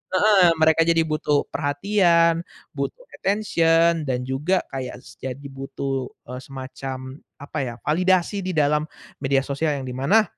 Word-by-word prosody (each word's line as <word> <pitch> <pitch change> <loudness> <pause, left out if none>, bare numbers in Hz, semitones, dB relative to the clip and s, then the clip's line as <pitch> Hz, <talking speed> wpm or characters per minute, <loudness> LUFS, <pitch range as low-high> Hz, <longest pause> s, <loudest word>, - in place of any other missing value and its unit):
heeh. 195 -1 +6
Mereka 160 0 +5
jadi 165 -1 +4
butuh 150 -1 +1
perhatian, 170 +2 +2 0.3
butuh - - -4 0.2
attention 170 -5 +2
dan 125 -1 -1
juga 150 +8 0
kayak 130 -2 -5
s - - -14
jadi 130 +1 -6
butuh, 135 -1 -4 0.2
eee, 125 - -5
semacam 130 0 -7 0.2
apa 145 - -8
ya, 120 -2 -4
validasi 185 +4 +2
di 185 - -2
dalam 150 +1 +2 0.3
media 135 -1 +2
sosial, 145 +2 -1
yang 135 - -5
di 125 - -4
mana 175 +12 +4
150 Hz, 145 wpm, -23 LUFS, 135-170 Hz, 0.3 s, heeh